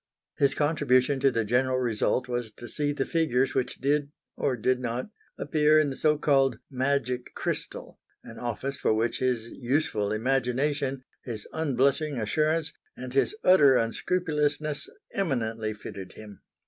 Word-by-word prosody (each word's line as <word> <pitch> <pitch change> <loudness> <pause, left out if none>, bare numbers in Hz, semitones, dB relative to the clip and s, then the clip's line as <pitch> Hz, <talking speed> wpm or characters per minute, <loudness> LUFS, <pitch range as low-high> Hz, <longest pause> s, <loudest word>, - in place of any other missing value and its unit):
His 140 -1 +3
contribution 145 -3 +2
to 135 0 +4
the 115 -4 -1
general 130 +3 +2
result 125 +1 0
was 120 -2 -3
to 120 - -10
see 145 +2 -1
the 140 -2 -1
figures 135 -6 +1
which 130 -2 -1
did 145 +2 +1 0.2
or 130 -2 0
did 125 +3 +1
not 125 - -3 0.3
appear 155 -1 +3
in 150 -2 +3
the - - -5
so 150 +1 +2
called 135 -5 +3
"magic" 130 -1 -1
crystal, - - -4 0.2
an 115 - -11
office 130 +3 -3
for 110 - +1
which 115 +2 0
his 125 -3 0
useful 120 -6 -1
imagination, 135 +4 0 0.2
his 110 -4 -6
unblushing 140 -1 +1
assurance, 155 +8 0 0.2
and 130 0 -7
his 140 - +2
utter 145 -8 +6
unscrupulousness 150 +3 -1 0.2
eminently 115 - -1
fitted 100 -3 -8
him. 105 -3 -12
130 Hz, 145 wpm, -27 LUFS, 120-145 Hz, 0.3 s, utter